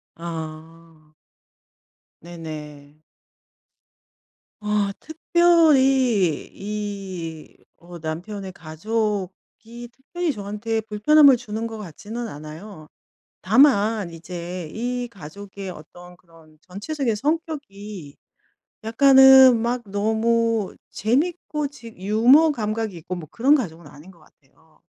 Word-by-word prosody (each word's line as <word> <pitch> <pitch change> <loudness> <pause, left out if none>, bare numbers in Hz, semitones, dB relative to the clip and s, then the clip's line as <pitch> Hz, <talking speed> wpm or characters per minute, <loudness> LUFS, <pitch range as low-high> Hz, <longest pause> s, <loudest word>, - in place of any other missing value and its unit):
아. 160 -1 -9 1.1
네 175 0 -11
네. 150 -2 -9 1.6
아 210 -1 0
특별히 270 - +3
이 195 -6 -6 0.3
어 175 0 -11
남편의 180 +5 -6
가족이 210 +6 -5
특별히 330 +4 -4
저한테 210 +2 -3
불편함을 260 +6 +5
주는 220 0 -5
것 225 -1 -6
같지는 215 +5 -7
않아요. 155 +1 -10 0.5
다만 220 -8 +3
이제 170 0 -7
이 245 +2 -3
가족의 195 +2 -9
어떤 175 +2 -13
그런 165 -3 -22
전체적인 230 +6 -3
성격이 210 - -4 0.7
약간은 265 +1 +7
막 240 +2 -1
너무 220 +1 0
재밌고 300 - -1
지 260 -5 -13
유머 240 - +4
감각이 215 -5 -3
있고 180 +2 -6
뭐 160 -4 -9
그런 265 +5 +3
가족은 170 - -3
아닌 150 +5 -14
것 170 -3 -20
같아요. 155 +1 -28
205 Hz, 195 characters per minute, -22 LUFS, 170-240 Hz, 1.6 s, 약간은